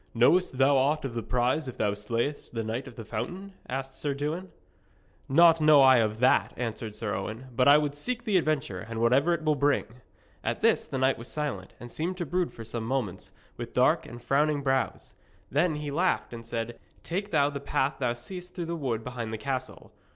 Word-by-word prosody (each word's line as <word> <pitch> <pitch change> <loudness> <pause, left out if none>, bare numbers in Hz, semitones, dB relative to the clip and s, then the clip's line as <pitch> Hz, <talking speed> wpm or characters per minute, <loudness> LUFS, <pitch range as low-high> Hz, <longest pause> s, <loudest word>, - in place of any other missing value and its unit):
'Knowest 135 +5 +3
thou 135 +1 +5
aught 145 +3 +1
of 130 - -4
the 115 - -2
prize 125 +5 0
if 130 - -7
thou 105 -1 +1
slayest 115 +7 -3
the 115 - -1
Knight 115 +5 -3
of 125 - -11
the 115 - -8
Fountain?' 190 - -5 0.2
asked 135 +1 -4
Sir 140 +1 -3
Dewin. 155 +6 -3 0.8
'Naught 165 +3 +6
know 155 -2 +7
I 130 -1 +7
of 110 -2 +1
that,' 125 +3 +3
answered 115 -3 -4
Sir 105 -1 -3
Owen; 115 +5 -5
'but 125 +2 +3
I 145 +1 +9
would 150 -1 0
seek 245 +12 -3
the 210 -5 +2
adventure, 150 - 0
and 110 +3 -6
whatever 130 +8 +3
it 170 -2 0
will 155 -1 +3
bring.' 140 -4 0 0.4
At - - -2
this - - +3
the 135 - -4
knight 130 -1 +2
was 115 - -8
silent, 140 -12 -4
and 120 -1 -9
seemed 180 +4 -3
to 175 - -2
brood 175 +3 -1
for 115 - -10
some 115 0 -4
moments, 110 -7 -3 0.3
with - - -7
dark - - +3
and 120 - -9
frowning 145 +3 +1
brows. 135 -1 -1 0.4
Then 155 +3 +2
he 150 -1 -4
laughed 175 -3 0
and 115 -1 -8
said: 115 0 -4 0.2
'Take 195 +4 -3
thou 145 -5 +2
the 140 - -4
path 135 0 -1
thou 125 -3 +1
seest 180 +9 -9
through 175 - -3
the 170 +1 -3
wood 125 -8 -2
behind 120 -3 -5
the 110 - -3
castle. 130 +2 -5
135 Hz, 210 wpm, -28 LUFS, 120-155 Hz, 0.8 s, I